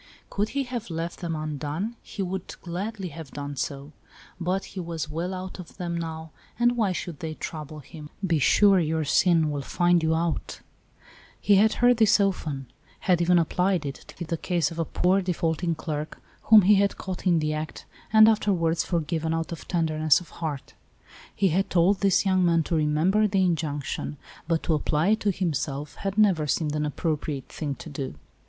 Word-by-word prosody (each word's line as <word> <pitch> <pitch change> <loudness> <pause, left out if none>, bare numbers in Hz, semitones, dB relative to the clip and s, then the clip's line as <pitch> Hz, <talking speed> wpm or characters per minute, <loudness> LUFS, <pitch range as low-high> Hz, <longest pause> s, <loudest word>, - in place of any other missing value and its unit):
Could 205 +2 0
he 275 - +2
have 245 -4 -5
left 165 +1 -4
them 170 -3 -3
undone, 155 - -3
he 200 - -5
would 185 0 -5
gladly 190 +2 -4
have 160 -1 -9
done 145 0 -6
so; 140 +2 -4 0.5
but 185 +2 -1
he 195 - -5
was 165 -3 -4
well 170 +4 -3
out 185 0 -6
of 175 - -11
them 175 -2 -3
now, 160 -1 -5 0.3
and 240 +1 +3
why 215 -5 +1
should 175 -4 -5
they 160 -1 -5
trouble 155 -1 -7
him? 150 +1 -11
" 195 - -3
Be 165 -4 +2
sure 195 +6 +5
your 160 -1 0
sin 160 0 +3
will 145 -1 -2
find 175 +4 +2
you 160 0 +2
out; 165 0 -2 0.4
" - - -25 0.3
he 200 -1 +4
had 215 +2 +4
heard 245 -1 +6
this 220 -2 +5
often, 160 -9 -1 0.4
had 180 -2 +2
even 175 +1 +4
applied 180 0 +1
it, 140 - -3
to - - -13
fit 170 -3 -7
the 165 - -1
case 170 0 0
of 165 - -7
a 165 - +1
poor 185 +4 +2
defaulting 170 -2 -1
clerk, 155 -1 -5 0.3
whom 215 -2 +8
he 205 +3 +6
had 200 0 +2
caught 185 0 -5
m 175 -2 +4
the 155 -1 0
act, 155 0 -5 0.3
and 220 0 +8
afterwards 175 -7 +2
forgiven 165 -1 -1
out 165 +1 -3
of 165 - -7
tender 160 -3 0
ness 155 -2 +5
of 175 -3 -13
heart. 150 -5 -4 0.6
He 195 - +2
had 190 +4 0
told 185 +3 +3
this 195 0 +3
young 185 -1 +3
man 170 -2 +3
to 165 - -2
remember 160 +8 +2
the 195 -2 +2
injunction, 150 -4 -2 0.3
but 165 -1 0
to 165 - +1
apply 155 +3 +1
it 220 +1 +3
to 210 - 0
him 180 -4 0
self 140 +1 -3
had 195 +1 -4
never 190 -8 +3
seemed 150 +1 0
an 150 0 0
appropriate 150 -2 -3
thing 145 -3 -4
to - - -10
do. 135 - -5
170 Hz, 200 wpm, -26 LUFS, 155-190 Hz, 0.6 s, whom